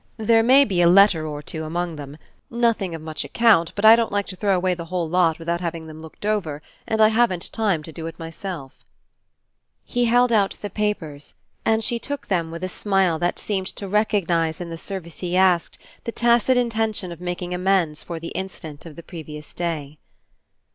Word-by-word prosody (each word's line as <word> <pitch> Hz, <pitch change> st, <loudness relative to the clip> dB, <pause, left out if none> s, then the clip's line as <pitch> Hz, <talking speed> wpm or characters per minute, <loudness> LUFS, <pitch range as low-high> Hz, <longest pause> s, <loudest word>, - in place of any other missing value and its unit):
There 225 Hz, +1 st, +4 dB
may 265 Hz, +5 st, +6 dB
be 185 Hz, -6 st, +1 dB
a 170 Hz, -, +6 dB
letter 180 Hz, -4 st, +5 dB
or 150 Hz, -1 st, -6 dB
two 160 Hz, +1 st, -5 dB
among 170 Hz, +1 st, -3 dB
them 145 Hz, 0 st, -9 dB, 0.3 s
nothing 230 Hz, -7 st, 0 dB
of 160 Hz, -, -9 dB
much 155 Hz, -1 st, -4 dB
account, 210 Hz, -8 st, +3 dB
but 205 Hz, -, 0 dB
I 220 Hz, +1 st, +10 dB
don't 230 Hz, -1 st, 0 dB
like 205 Hz, 0 st, 0 dB
to 185 Hz, -, -6 dB
throw 200 Hz, 0 st, +1 dB
away 180 Hz, 0 st, +1 dB
the 170 Hz, -1 st, -6 dB
whole 175 Hz, -1 st, -2 dB
lot 165 Hz, -1 st, +2 dB
without 170 Hz, +1 st, -2 dB
having 165 Hz, -2 st, -4 dB
them 155 Hz, 0 st, -10 dB
looked 160 Hz, +5 st, -11 dB
over 170 Hz, -9 st, -1 dB, 0.2 s
and 220 Hz, -, -1 dB
I 215 Hz, 0 st, +7 dB
haven't 220 Hz, -6 st, +1 dB
time 200 Hz, -8 st, 0 dB
to 160 Hz, -, -9 dB
do 160 Hz, +1 st, -6 dB
it 165 Hz, -, -8 dB
myself." 165 Hz, -3 st, -7 dB, 1.0 s
He 245 Hz, -1 st, 0 dB
held 245 Hz, +1 st, +4 dB
out 205 Hz, -3 st, +2 dB
the 205 Hz, -, -6 dB
papers 165 Hz, -9 st, -3 dB, 0.3 s
and 225 Hz, 0 st, +2 dB
she 235 Hz, +1 st, 0 dB
took 285 Hz, +4 st, -5 dB
them 170 Hz, -4 st, 0 dB
with 170 Hz, +2 st, -7 dB
a -, -, 0 dB
smile 190 Hz, -3 st, +1 dB
that 175 Hz, 0 st, 0 dB
seemed 190 Hz, -3 st, -2 dB
to 200 Hz, -, -5 dB
recognize 180 Hz, -6 st, +1 dB
in 175 Hz, -2 st, -6 dB
the -, -, -4 dB
service 180 Hz, -4 st, -7 dB
he 180 Hz, 0 st, -1 dB
asked 185 Hz, -3 st, +3 dB, 0.3 s
the 230 Hz, -, -2 dB
tacit 240 Hz, +2 st, +3 dB
intention 220 Hz, -6 st, 0 dB
of 170 Hz, 0 st, -9 dB
making 180 Hz, 0 st, -4 dB
amends 180 Hz, -4 st, +1 dB
for 170 Hz, -2 st, -6 dB
the 165 Hz, -, -6 dB
incident 165 Hz, -5 st, -7 dB
of 155 Hz, -, -11 dB
the 170 Hz, -, -10 dB
previous 150 Hz, -4 st, -9 dB
day. 155 Hz, -4 st, -4 dB
180 Hz, 200 wpm, -23 LUFS, 165-210 Hz, 1.0 s, I